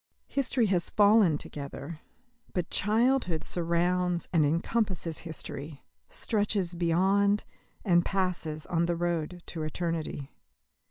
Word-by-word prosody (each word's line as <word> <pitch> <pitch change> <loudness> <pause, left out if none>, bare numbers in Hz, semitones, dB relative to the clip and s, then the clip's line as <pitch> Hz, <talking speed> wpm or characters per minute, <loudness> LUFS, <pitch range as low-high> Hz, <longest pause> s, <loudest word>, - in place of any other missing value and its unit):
History 260 -3 +1
has 185 -4 0
fallen 205 -6 +5
together, 145 +2 -7 0.5
but 180 -2 -2
childhood 220 -5 +2
surrounds 175 +1 0
and 165 -3 +5
encompasses 170 +2 0
history, 150 -3 -7 0.3
stretches 205 -4 0
beyond 190 +4 +2 0.4
and 175 -3 +4
passes 175 -6 -1
on 170 0 +1
the 175 - +1
road 175 0 -2
to 165 - -6
eternity. 155 -3 -3
175 Hz, 105 wpm, -29 LUFS, 165-200 Hz, 0.5 s, fallen